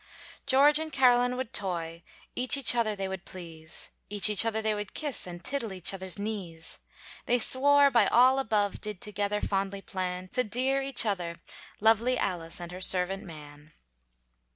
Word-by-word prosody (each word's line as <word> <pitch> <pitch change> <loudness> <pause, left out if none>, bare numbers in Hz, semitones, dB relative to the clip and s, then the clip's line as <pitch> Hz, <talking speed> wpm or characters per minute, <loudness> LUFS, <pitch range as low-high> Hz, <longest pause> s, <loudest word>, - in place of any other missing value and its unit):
George 290 +3 +5
and 315 0 -5
Caroline 250 -2 +3
would 260 -3 -5
toy, 170 -4 -3 0.3
Each 255 +1 +4
other 225 -3 0
they 195 -1 -4
would 190 -1 -6
please, 165 -3 -10 0.2
Each 210 0 +5
other 225 -1 -1
they 220 0 0
would 210 -1 -6
kiss, 290 -10 -3
And 175 0 -9
tiddle 255 -5 -3
each 185 0 -1
other's 190 -1 -3
knees. 195 -6 -6 0.5
They 245 - +3
swore 280 +4 +4
by 240 - +4
all 255 +3 +4
above, 210 -5 -1
Did 210 -3 -4
together 205 0 -3
fondly 195 0 -2
plan, 185 -1 -5
To 250 - 0
dear 260 +5 0
each 270 -3 +2
other, 180 -5 -2 0.4
lovely 225 +4 +3
Alice 170 -5 -3
and 175 0 -8
her 180 +1 -9
servant 190 +2 +1
man. 150 -2 -13
205 Hz, 160 wpm, -28 LUFS, 180-245 Hz, 0.5 s, George